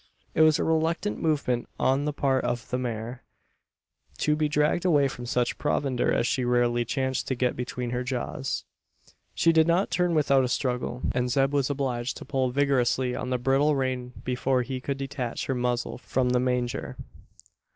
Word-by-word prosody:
It - - +2
was 155 -1 +6
a - - 0
reluctant 160 +5 0
movement 140 -7 0
on 135 +2 +2
the 150 - 0
part 135 -2 +1
of 120 -1 -2
the 125 - 0
mare 120 0 -4 1.0
to 150 - +2
be 150 0 0
dragged 150 +3 +2
away 150 -6 +4
from 120 -2 -7
such 120 0 0
provender 130 -4 0
as - - +1
she 130 - 0
rarely 120 -1 +2
chanced 130 +1 -1
to 130 - 0
get 125 0 0
between 125 0 -4
her 125 +1 -1
jaws. 130 +2 -3 0.7
She 165 - +4
did 160 0 +5
not 175 +4 +2
turn 180 -2 +1
without 140 -3 +4
a - - +1
struggle; 125 0 -2
and 125 0 0
Zeb 135 +2 +2
was 140 -2 +1
obliged 130 -3 -2
to - - -9
pull 130 -2 0
vigorously 130 -2 +1
on - - -4
the 125 - +1
bridle 135 +4 +2
rein 130 -2 -2
before 125 0 0
he 130 +1 -5
could 140 +1 -3
detach 135 -3 -4
her 135 - -1
muzzle 125 -1 -1
from 130 0 0
the 125 0 +2
manger. 125 -1 -1
130 Hz, 180 wpm, -27 LUFS, 125-145 Hz, 1.0 s, was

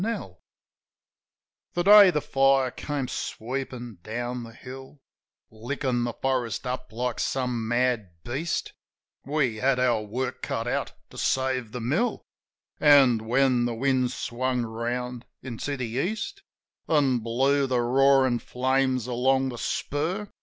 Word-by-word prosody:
84 225 +4 0
JIM - - -2
OF - - -5
THE - - -13
HILLS 90 - -25 1.4
The 175 - +1
day 205 0 +9
the 150 -4 0
fire 135 -2 +3
came 145 -1 -4
sweepin' 125 -4 -5
down 120 +4 -4
the 115 - -10
hill, 130 +4 -11 0.5
Lickin' 120 +2 -2
the 120 - -3
forest 130 -3 -2
up 125 -1 -4
like 120 +1 -3
some 125 -4 -1
mad 120 -4 +1
beast, 145 +7 -3 0.5
We 135 -6 0
had 130 +3 +2
our 120 -3 +2
work 125 +5 -4
cut 115 +1 -3
out - - -2 0.2
to - - -8
save 130 -3 0
the 125 0 -5
mill; 155 - 0 0.6
An', 130 -7 +5
when 125 0 +3
the 120 -1 -2
wind 130 0 +1
swung 125 0 -2
round 120 +2 -4 0.2
into 130 +3 -4
the 125 - -2
East, 140 - -3 0.5
An' 140 -6 +3
blew 135 +5 +1
the 125 -2 +1
roarin' 130 0 +4
flames 130 -1 0
along 130 +2 +1
the 120 -2 -7
spur. 170 +9 -2
125 Hz, 145 wpm, -26 LUFS, 120-135 Hz, 1.4 s, day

